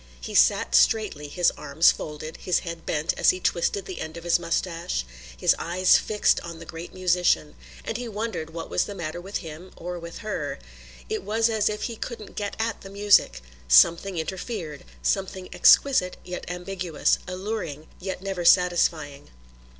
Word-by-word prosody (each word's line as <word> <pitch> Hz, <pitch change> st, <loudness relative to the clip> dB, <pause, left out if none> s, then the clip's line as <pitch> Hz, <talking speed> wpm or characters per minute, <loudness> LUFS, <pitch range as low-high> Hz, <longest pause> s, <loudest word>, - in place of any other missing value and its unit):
He -, -, -7 dB
sat -, -, +4 dB
straightly, 150 Hz, -, +3 dB
his 175 Hz, +4 st, +2 dB
arms 150 Hz, +3 st, +3 dB
folded, 155 Hz, +1 st, -7 dB
his 180 Hz, -, 0 dB
head 170 Hz, -1 st, -7 dB
bent 155 Hz, +2 st, 0 dB
as -, -, +5 dB
he 185 Hz, -, +2 dB
twisted 180 Hz, +2 st, 0 dB
the 185 Hz, -3 st, -6 dB
end 160 Hz, +1 st, -6 dB
of 170 Hz, -, -9 dB
his 175 Hz, 0 st, +3 dB
moustache, 165 Hz, -, -2 dB, 0.3 s
his -, -, +3 dB
eye 175 Hz, +2 st, -4 dB
fixed 210 Hz, +3 st, +4 dB
on 170 Hz, -1 st, -8 dB
the 165 Hz, -, -10 dB
great 165 Hz, +1 st, -8 dB
musician; 180 Hz, -4 st, +1 dB, 0.3 s
and 225 Hz, -, -3 dB
he 245 Hz, 0 st, -5 dB
wondered 215 Hz, -6 st, -4 dB
what 165 Hz, 0 st, -6 dB
was -, -, 0 dB
the 205 Hz, -, -7 dB
matter 170 Hz, -1 st, -5 dB
with 195 Hz, +3 st, -4 dB
him, 160 Hz, +4 st, -9 dB
or 175 Hz, +1 st, -5 dB
with 170 Hz, 0 st, -8 dB
her. 165 Hz, -9 st, -3 dB, 0.5 s
It -, -, -2 dB
was 225 Hz, +3 st, +1 dB
as 215 Hz, -1 st, +2 dB
if 210 Hz, 0 st, -4 dB
he 230 Hz, -2 st, -4 dB
couldn't 225 Hz, -4 st, -7 dB
get 205 Hz, -1 st, -3 dB
at 225 Hz, -1 st, -2 dB
the 195 Hz, -, -10 dB
music. 200 Hz, -, +3 dB, 0.2 s
Something 170 Hz, -, +5 dB
interfered, 165 Hz, -, -5 dB, 0.2 s
something 190 Hz, -1 st, -1 dB
exquisite 220 Hz, -10 st, +5 dB
yet 180 Hz, 0 st, -7 dB
ambiguous, 180 Hz, -2 st, -1 dB
alluring 185 Hz, -5 st, -4 dB
yet 190 Hz, 0 st, -5 dB
never 195 Hz, -3 st, -3 dB
satisfying. 170 Hz, -, +2 dB
180 Hz, 170 wpm, -25 LUFS, 160-195 Hz, 0.5 s, as